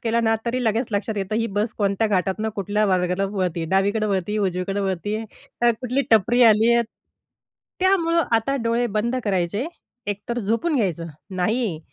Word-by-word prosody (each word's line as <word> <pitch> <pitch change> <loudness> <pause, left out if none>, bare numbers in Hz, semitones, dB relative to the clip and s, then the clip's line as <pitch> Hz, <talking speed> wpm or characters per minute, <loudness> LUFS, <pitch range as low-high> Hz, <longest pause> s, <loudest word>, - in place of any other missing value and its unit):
केला 230 0 +1
ना, 225 -1 +2
तरी 250 +1 0
लगेच 225 +2 +1
लक्षात 210 +1 -1
येतं 195 +2 -2
ही 230 0 +1
बस 215 +2 0
कोणत्या 200 +2 +1
घाटातनं 195 +2 0
कुठल्या 205 +2 0
मार्गाला 180 0 +1
वळत 185 -3 0
आहे. 165 - -2
डावीकडं 200 +4 +1
वळत 190 -2 +1
आहे, 210 - -1
उजवीकडं 195 +1 -1
वळत 190 0 -2
आहे. 215 +2 -2 0.4
तर 240 0 +5
कुठली 255 +2 0
टपरी 235 +3 +4
आली 225 +1 +6
आहे. 235 - +4 1.0
त्यामुळं 340 -3 +3
आता 230 +5 +2
डोळे 235 +1 +1
बंद 235 +4 0
करायचे. 195 - 0 0.4
एकतर 205 +4 -3
झोपून 235 +9 0
घ्यायचं. 170 -7 -1 0.2
नाही, 190 -1 -1
215 Hz, 170 wpm, -23 LUFS, 195-235 Hz, 1.0 s, आली